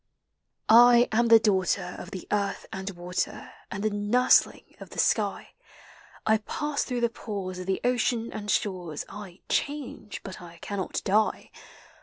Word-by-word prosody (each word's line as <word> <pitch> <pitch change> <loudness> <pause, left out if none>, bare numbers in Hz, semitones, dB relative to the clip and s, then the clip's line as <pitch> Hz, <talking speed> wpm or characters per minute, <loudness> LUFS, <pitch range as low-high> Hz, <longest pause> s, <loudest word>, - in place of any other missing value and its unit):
I 240 +2 +7
am 235 +2 +3
the 230 0 +9
daughter 190 -4 0
of 180 - -8
the 185 -3 -8
earth 200 -1 -1
and 190 +1 -4
water; 180 -1 -4 0.2
And 200 - -5
the 215 - +1
nursling 210 +5 +2
of - - -11
Hie - - -11
sk.\; - - +3 1.1
I 220 0 +4
pass 295 +3 -2
through 245 -2 -3
the 235 - +2
pores 195 -5 -5
of 185 - -7
the 190 - -1
ocean 245 -1 0
and 210 -1 -6
shore*; 180 -6 -1
I 195 -3 -10
change, 270 -7 -3
but 190 -1 -8
I 170 -1 -12
cannot 195 +2 -4
die. 215 +2 +1
205 Hz, 155 wpm, -27 LUFS, 190-235 Hz, 1.1 s, the